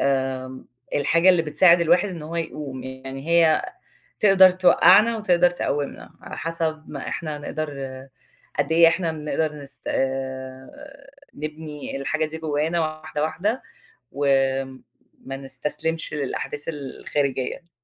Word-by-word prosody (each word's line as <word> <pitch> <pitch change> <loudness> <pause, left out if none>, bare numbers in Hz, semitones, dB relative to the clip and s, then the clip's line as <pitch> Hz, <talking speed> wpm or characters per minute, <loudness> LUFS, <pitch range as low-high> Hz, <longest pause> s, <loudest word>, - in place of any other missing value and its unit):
امم، 130 -1 -1 0.3
الحاجة 165 +5 +3
اللي 180 -3 +5
بتساعد 170 +3 +5
الواحد 175 +4 +3
إن 170 -4 -7
هو 165 +2 -6
يقوم، 145 -5 -5
يعني 135 +2 -8
هي 165 -2 +4 0.6
تقدر 195 -2 +7
توقّعنا 185 +4 +5
وتقدر 180 -5 +3
تقوّمنا، 145 -5 -3
على - - -8
حسب 160 -1 -2
ما 140 - -6
إحنا 155 -3 -4
نقدر 155 +1 -4 0.9
قد 145 +2 +1
إيه 165 0 +7
إحنا 165 -1 0
بنقدر 150 0 -2
نس 140 -2 -6
آآ، 130 0 -3 0.6
نبني 150 -1 -6
الحاجة 155 +3 -1
دي 155 +1 -7
جوانا 160 +2 -1
واحدة، 155 -1 -3
واحدة 195 +10 -1 0.5
و 145 +1 -2 1.0
ما 135 0 -5
نستسلمش 150 +5 -2
للأحداث 145 0 -3
الخارجية. 140 +1 -3
155 Hz, 120 wpm, -23 LUFS, 140-170 Hz, 1.0 s, تقدر